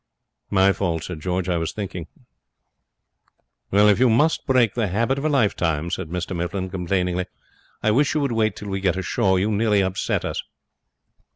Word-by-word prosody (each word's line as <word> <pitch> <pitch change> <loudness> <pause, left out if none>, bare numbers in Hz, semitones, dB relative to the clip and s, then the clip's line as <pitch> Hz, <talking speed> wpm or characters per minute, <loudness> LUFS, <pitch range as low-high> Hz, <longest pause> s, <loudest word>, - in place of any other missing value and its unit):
'My 95 -1 +4
fault,' 85 -5 -2
said 90 -4 -6
George; 90 +3 -2
'I 90 -2 +1
was 80 - -3
thinking.' 90 -5 -5 1.6
'If 105 +1 +5
you 130 -1 +5
must 150 +10 +2
break 125 -6 +3
the 115 -3 0
habit 115 +8 0
of 145 - -4
a - - +2
lifetime,' 85 - +1
said 95 -2 -3
Mr 90 +1 -4
Mifflin, 90 +2 -3
complainingly, 90 0 -1 0.6
'I 110 - +3
wish 140 +7 +2
you 150 - +2
would 140 -3 0
wait 110 -1 +1
till 105 - -7
we 95 0 -2
get 95 -1 +1
ashore. 95 0 +1
You 100 +4 +1
nearly 105 -1 +2
upset 95 0 -1
us.' - - -3
95 Hz, 175 wpm, -23 LUFS, 90-110 Hz, 1.6 s, If